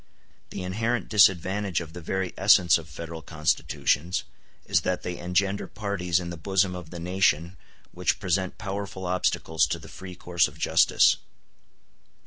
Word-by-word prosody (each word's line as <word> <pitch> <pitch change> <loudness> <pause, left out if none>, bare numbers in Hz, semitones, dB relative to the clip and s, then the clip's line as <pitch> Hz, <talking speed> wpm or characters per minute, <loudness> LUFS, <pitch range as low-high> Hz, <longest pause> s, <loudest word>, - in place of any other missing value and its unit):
The 95 - -6
inherent 115 +6 -1
disadvantage 95 -2 +3
of 80 -2 -8
the 90 - -8
very 95 +2 -2
essence 90 -4 +5
of 80 -1 -12
Federal 80 +2 -7
constitutions 75 +1 0 0.4
is 95 -3 +2
that 90 +1 -2
they 90 -1 -5
engender 95 +3 0
parties 95 -5 -1
in 85 -1 -5
the 85 - -6
bosom 95 +3 +1
of 90 -3 -8
the 85 - -8
nation 90 -1 +1 0.4
which - - 0
present 95 0 -1
powerful 100 -2 -5
obstacles 90 -3 +1
to - - -2
the - - -12
free 95 -1 -10
course 85 -1 +1
of - - -14
justice. - - +4
90 Hz, 150 wpm, -26 LUFS, 85-95 Hz, 0.4 s, essence